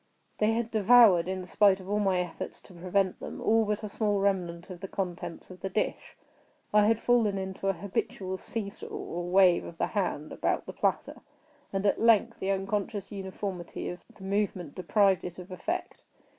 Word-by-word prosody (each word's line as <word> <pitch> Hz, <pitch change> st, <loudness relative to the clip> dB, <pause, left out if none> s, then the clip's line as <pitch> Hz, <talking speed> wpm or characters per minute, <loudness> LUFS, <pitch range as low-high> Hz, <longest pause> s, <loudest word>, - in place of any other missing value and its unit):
They 215 Hz, +1 st, +3 dB
had 230 Hz, 0 st, -1 dB
devoured, 215 Hz, -5 st, +6 dB
in 185 Hz, -1 st, -3 dB
spite 200 Hz, +1 st, +4 dB
of 190 Hz, -, -11 dB
all 205 Hz, +1 st, 0 dB
my 195 Hz, -3 st, +2 dB
efforts 175 Hz, -2 st, -6 dB
to 190 Hz, -, -16 dB
prevent 185 Hz, +2 st, 0 dB
them, -, -, -7 dB
all 225 Hz, 0 st, +3 dB
but 210 Hz, +1 st, -2 dB
a 210 Hz, -, -4 dB
small 205 Hz, -1 st, 0 dB
remnant 180 Hz, -3 st, -1 dB
of 180 Hz, -, -8 dB
the 195 Hz, -, -6 dB
contents 180 Hz, -2 st, -5 dB
of 185 Hz, -, -11 dB
the 195 Hz, -, -3 dB
dish. 210 Hz, -, -2 dB, 0.6 s
I 210 Hz, 0 st, +6 dB
had 225 Hz, 0 st, +4 dB
fallen 230 Hz, -4 st, +2 dB
into 190 Hz, 0 st, -4 dB
an 195 Hz, -, +1 dB
habitual 190 Hz, 0 st, -3 dB
see 225 Hz, -3 st, -3 dB
saw, -, -, -10 dB
or 175 Hz, +1 st, -5 dB
wave 185 Hz, -1 st, +5 dB
of 165 Hz, -, -9 dB
the -, -, +1 dB
hand 180 Hz, -7 st, -2 dB
about -, -, -1 dB
the -, -, -7 dB
platter; -, -, -1 dB, 0.5 s
and, 195 Hz, +1 st, -2 dB
at 200 Hz, -, +2 dB
length, 230 Hz, 0 st, +4 dB
the 190 Hz, -, -2 dB
unconscious 195 Hz, +1 st, -2 dB
uniformity 190 Hz, -2 st, -5 dB
of 180 Hz, -, -6 dB, 0.2 s
the 200 Hz, -, -13 dB
movement 195 Hz, -5 st, -1 dB
deprived 190 Hz, +1 st, +2 dB
it 175 Hz, -1 st, -6 dB
of 180 Hz, +1 st, -10 dB
effect. 185 Hz, -, -4 dB
195 Hz, 190 wpm, -29 LUFS, 185-210 Hz, 0.6 s, devoured